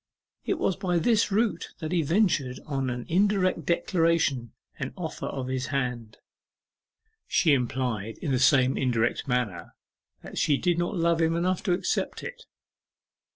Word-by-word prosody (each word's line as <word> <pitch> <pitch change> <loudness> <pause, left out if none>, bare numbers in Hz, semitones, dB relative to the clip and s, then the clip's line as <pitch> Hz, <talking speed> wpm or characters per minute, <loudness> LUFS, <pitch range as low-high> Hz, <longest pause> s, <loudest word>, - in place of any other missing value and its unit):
It - - 0
was 190 - 0
by 180 -2 0
this 210 +5 +2
route 210 -3 0
that 160 -1 -5
he 175 -2 +2
ventured 155 -6 +1
on 135 -3 -2
an 120 0 -4
indirect 190 +1 +1
declaration 165 - +1 0.3
and - - -4
offer - - -5
of 130 - -4
his 130 -1 -2
hand. 125 -5 -3 1.1
She 160 -5 +3
implied 120 -4 -1
in 150 - -3
the 130 - +2
same 130 0 +4
indirect 120 +1 0
manner 125 -8 -2 0.5
that - - -6
she 145 -2 +3
did 175 +1 +1
not 175 +2 -1
love 170 0 +2
him 165 0 +2
enough 180 +1 0
to 180 - +3
accept 175 - -1
it. - - -8
155 Hz, 155 wpm, -27 LUFS, 125-175 Hz, 1.1 s, same